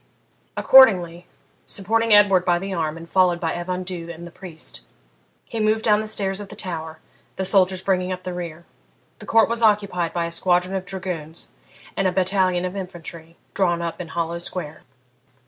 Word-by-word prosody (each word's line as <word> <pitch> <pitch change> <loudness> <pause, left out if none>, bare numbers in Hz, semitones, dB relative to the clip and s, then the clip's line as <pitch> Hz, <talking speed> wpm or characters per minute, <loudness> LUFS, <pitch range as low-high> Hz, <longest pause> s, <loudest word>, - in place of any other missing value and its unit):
Accordingly, 180 -10 +5 0.4
supporting 225 +3 0
Edward 200 -3 +6
by 175 -1 +2
the 195 +2 -5
arm 160 -2 -2
and 165 0 -10
followed 180 -1 +3
by 165 -2 -1
Evan 180 +1 -3
Dhu 175 -2 -6
and 170 0 -8
the 175 - -10
priest, 170 - -9 0.6
he 230 - -5
moved 215 +1 +1
down 210 -1 +4
the 215 - -4
stairs 195 -2 -2
of 205 -2 -8
the - - -10
tower, 160 -4 -5 0.4
the 190 - -2
soldiers 185 -1 +3
bringing 185 -1 0
up 185 0 -5
the 180 - -4
rear. 170 -1 -7 0.5
The - - -11
court 225 0 +5
was 235 0 -2
occupied 200 -6 +2
by 170 -1 -1
a 170 - -5
squadron 180 +2 +1
of 190 -1 -3
dragoons 180 -5 -6 0.4
and 195 - +1
a - - +1
battalion 185 -1 +1
of 185 +1 -4
infantry, 170 -3 -8 0.2
drawn 175 -3 +1
up 170 +1 -4
in 175 - -7
hollow 170 +1 -3
square. 160 -3 -6
180 Hz, 180 wpm, -22 LUFS, 170-195 Hz, 0.6 s, Edward